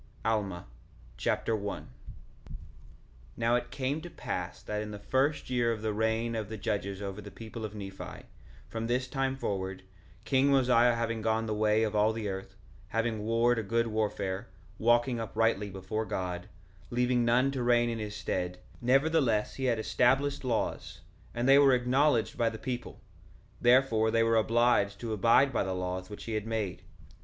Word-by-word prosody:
Alma 100 -5 -1 0.5
Chapter 115 - 0
1 100 -1 -4
1:1 - - -15 1.5
Now 115 0 +2
it 120 - 0
came 140 +3 -2
to 175 - -8
pass 90 - -5
that 105 0 -3
in 105 - -5
the 105 - -6
first 130 +6 0
year 120 -2 +2
of 110 -1 -4
the 110 -1 0
reign 110 +2 0
of 110 -3 -3
the 110 - -5
judges 100 -1 -3
over 100 +1 -5
the 100 - -9
people 115 +1 -8
of 110 -1 -5
Nephi, 95 -2 -8 0.4
from 115 0 -4
this 125 +2 0
time 135 0 -1
forward, 95 -5 -3 0.4
king 135 0 +3
Mosiah 125 -3 +4
having 115 -1 -2
gone 110 0 +1
the 110 - -2
way 105 +1 +2
of 110 -1 -1
all 105 +1 +3
the 110 -2 -3
earth, 95 -1 -6 0.3
having 115 0 -1
warred 115 +1 +2
a - - 0
good 115 +3 0
warfare, 105 -2 -2 0.3
walking 120 +1 +3
uprightly 115 -2 0
before 95 +3 -4
God, 90 -3 -4 0.4
leaving 125 0 +2
none 125 +3 +3
to 135 -2 -3
reign 120 0 +3
in 115 -1 -2
his 105 -1 -5
stead; 90 -4 -2 0.2
nevertheless 130 -3 +2
he 135 - -3
had 120 -3 +2
established 135 +6 +1
laws, 120 -3 -2 0.3
and 120 +2 0
they 135 +1 +8
were 135 -2 +6
acknowledged 125 -1 +2
by 115 -1 +3
the 110 - -7
people; 125 -1 -5 0.6
therefore 120 -3 +4
they 115 +1 +3
were 115 0 +3
obliged 110 -3 +2
to 115 -2 -3
abide 115 +6 +4
by - - +1
the 95 -1 -2
laws 90 +1 -4
which 105 - -8
he 115 - -5
had 110 0 -2
made. 110 -6 -2
115 Hz, 175 wpm, -30 LUFS, 105-125 Hz, 1.5 s, they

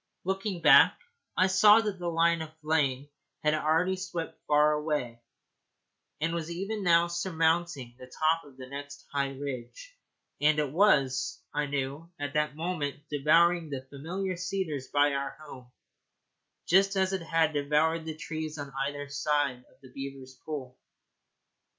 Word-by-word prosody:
Looking 190 -1 -3
back, - - +7 0.4
I 185 - +5
saw 205 +3 +6
that 210 -4 -3
the 175 - -4
line 170 0 +2
of 160 0 -9
flame 145 -3 0 0.4
had 150 0 +3
already 160 +4 +2
swept 180 -3 -5
far 150 +1 +4
away, 150 -6 -2 1.0
and 165 +2 -1
was 170 -1 -3
even 195 +5 -4
now 170 -1 +5
surmounting 165 -6 0
the 125 - -10
top 160 +5 +1
of 140 -3 -17
the 130 - -8
next 140 +2 -9
high 140 -1 0
ridge; 140 - -7 0.5
and 150 +1 +4
it 150 -3 0
was, 140 -8 +2
I 145 0 0
knew, 140 +3 -3
at 145 -1 -4
that 150 -1 0
moment 155 -4 -3
devouring 165 +3 +3
the 135 -2 -5
familiar 180 +6 -4
cedars 180 -7 -3
by 145 0 +3
our 140 0 -3
home, 130 -5 -12 0.9
just 195 +2 +4
as 190 0 +1
it 190 - -1
had 165 -1 +1
devoured 150 +3 +1
the 160 -1 -5
trees 155 -1 -5
on 140 -2 -7
either 145 0 -5
side 145 -3 -1
of 130 - -28
the 130 - -14
beavers' 135 -1 -8
pool. 130 -5 -6
155 Hz, 150 wpm, -29 LUFS, 140-170 Hz, 1.0 s, back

